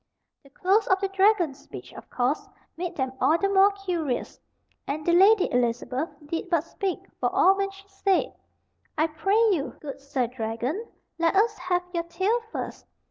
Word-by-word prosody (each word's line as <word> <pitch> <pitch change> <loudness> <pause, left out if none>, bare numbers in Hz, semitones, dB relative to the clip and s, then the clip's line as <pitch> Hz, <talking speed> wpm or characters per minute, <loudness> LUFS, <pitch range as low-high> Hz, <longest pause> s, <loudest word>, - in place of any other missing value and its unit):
The 275 - -20
close 390 +9 +2
of 380 - +3
the 390 0 -1
dragon's 380 -7 +2
speech, - - -11
of - - -12
course, 255 +4 -1 0.3
made 350 +1 -4
them 260 -2 -2
all 320 - +4
the 395 - +1
more 395 0 +5
curious; 355 -10 -3 0.5
and 300 +2 -3
the 345 - +3
Lady 390 +3 +6
Elizabeth 245 +4 0 0.2
did 330 +4 -4
but 335 -4 +2
speak 375 +2 -4
for - - +1
all 385 - +5
when 395 0 -1
she 390 0 -15
said: 390 -1 0 0.6
"I 310 - +3
pray 330 +6 0
you, 305 -7 -1
good 280 -2 -8
Sir 275 -2 -1
Dragon, 245 - -3 0.3
let 335 +2 +2
us 430 +2 +3
have 360 0 0
your 340 - 0
tale 380 +8 0
first. - - -6
350 Hz, 175 wpm, -26 LUFS, 280-390 Hz, 0.6 s, Lady